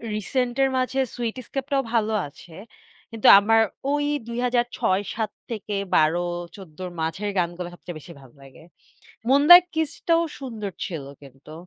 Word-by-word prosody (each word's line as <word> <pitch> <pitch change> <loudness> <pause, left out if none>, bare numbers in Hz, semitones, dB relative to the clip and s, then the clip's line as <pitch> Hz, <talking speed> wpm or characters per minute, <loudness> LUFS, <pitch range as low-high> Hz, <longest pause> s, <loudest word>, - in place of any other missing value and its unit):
Recent 245 +4 -2
এর 270 - +3
মাঝে, 255 +1 -1 0.2
sweet 235 -1 -3
escape 270 -1 -4
টাও 275 -1 +2
ভালো 220 -1 +1
আছে। 165 +4 -16 0.6
কিন্তু 225 -2 0
আমার 225 +2 +3 0.3
ওই 290 0 0 0.2
২০০৬-৭ 235 -3 -1 0.2
থেকে 210 -2 -4 0.2
১২-১৪ 175 +1 -1
এর 180 - -6
মাঝের 165 +6 -2
গানগুলো 175 0 -2
সবচেয়ে 175 -1 -9
বেশি 170 +3 -12
ভালো 130 -3 -17
লাগে। 135 +3 -16 0.7
মুনলাইট 305 +6 +8
কিস 320 -2 0 0.2
টাও 335 0 +4 0.2
সুন্দর 225 -7 -6
ছিল 160 -6 -5 0.2
কিন্তু। 135 +2 -15
210 Hz, 140 wpm, -24 LUFS, 175-250 Hz, 0.7 s, মুনলাইট